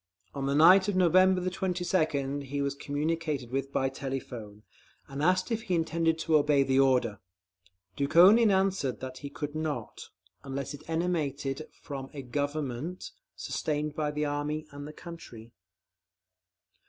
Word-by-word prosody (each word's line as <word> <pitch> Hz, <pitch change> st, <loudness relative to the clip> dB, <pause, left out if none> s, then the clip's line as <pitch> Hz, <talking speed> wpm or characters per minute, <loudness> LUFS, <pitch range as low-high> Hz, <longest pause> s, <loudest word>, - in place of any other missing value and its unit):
On 135 Hz, -1 st, -3 dB
the 140 Hz, -, +1 dB
night 185 Hz, +6 st, +7 dB
of 205 Hz, -, 0 dB
November 185 Hz, 0 st, +4 dB
22nd 170 Hz, -7 st, -1 dB
he 140 Hz, +2 st, -4 dB
was 140 Hz, 0 st, 0 dB
communicated 145 Hz, -2 st, -2 dB
with 135 Hz, +1 st, -2 dB
by 135 Hz, -, +1 dB
telephone, 125 Hz, -6 st, -6 dB, 0.4 s
and 140 Hz, +1 st, -6 dB
asked 185 Hz, +6 st, +2 dB
if 225 Hz, -1 st, 0 dB
he 195 Hz, -6 st, -1 dB
intended 165 Hz, 0 st, +1 dB
to 160 Hz, -1 st, +3 dB
obey 145 Hz, -1 st, +3 dB
the 135 Hz, 0 st, +2 dB
order. 125 Hz, -6 st, +2 dB, 0.8 s
Dukhonin 185 Hz, -, +6 dB
answered 190 Hz, -9 st, +1 dB
that 130 Hz, 0 st, -7 dB
he 140 Hz, -, -7 dB
could 145 Hz, 0 st, -5 dB
not, 155 Hz, -1 st, -4 dB, 0.3 s
unless 135 Hz, +1 st, -4 dB
it 145 Hz, +2 st, -12 dB
emanated 155 Hz, -4 st, -2 dB, 0.2 s
from 135 Hz, -2 st, -6 dB
"a 140 Hz, -, -6 dB
Government 145 Hz, +4 st, -3 dB, 0.2 s
sustained 150 Hz, 0 st, -2 dB
by 150 Hz, -1 st, -1 dB
the 150 Hz, 0 st, -2 dB
Army 145 Hz, +1 st, -2 dB
and 145 Hz, 0 st, -8 dB
the -, -, -7 dB
country." 125 Hz, -10 st, -11 dB
145 Hz, 140 wpm, -29 LUFS, 135-170 Hz, 0.8 s, night